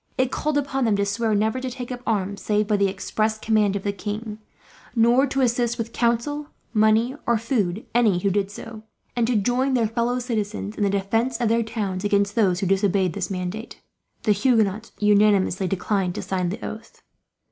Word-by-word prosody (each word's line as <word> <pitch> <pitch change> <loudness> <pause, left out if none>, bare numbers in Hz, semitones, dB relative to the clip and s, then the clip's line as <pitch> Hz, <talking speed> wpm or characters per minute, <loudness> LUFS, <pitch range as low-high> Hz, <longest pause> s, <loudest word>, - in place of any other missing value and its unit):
It 260 0 +1
called 300 -1 -1
upon 270 -2 0
them 220 -3 +3
to 200 0 +1
swear 215 +2 0
never 220 +5 0
to 260 - -3
take 250 0 -7
up 245 -1 -5
arms, 200 -2 -1
save 210 0 +1
by 210 - +2
the 200 0 +3
express 215 +3 -1
command 215 -2 +2
of 200 - -3
the 200 - 0
king; 210 +2 -5 0.6
nor 240 +4 +4
to 270 0 -1
assist 240 -1 +1
with 230 -1 -4
counsel, 240 +6 0 0.3
money, 220 +3 +3
or 235 -1 +3
food 220 -4 -1
any 225 -6 +3
who 195 +2 0
did 195 0 0
so; 215 +2 -9 0.3
and 235 -2 +1
to 245 - +1
join 245 +6 +1
their 235 -2 +2
fellow 235 +3 0
citizens 215 -4 -3
in - - -6
the 200 - +3
defence 225 +5 0
of 235 -3 +1
their 230 +1 +3
towns 210 -5 -3
against 200 0 +2
those 195 -5 +2
who - - 0
disobeyed 195 -1 +2
this 190 -3 -3
mandate. 190 +4 -5 0.4
The 215 - +3
Huguenots 215 0 +1
unanimously 205 -2 +3
declined 190 0 -1
to - - -4
sign 185 -2 -1
the 190 - -5
oath. 220 +1 -9
215 Hz, 195 wpm, -23 LUFS, 200-235 Hz, 0.6 s, nor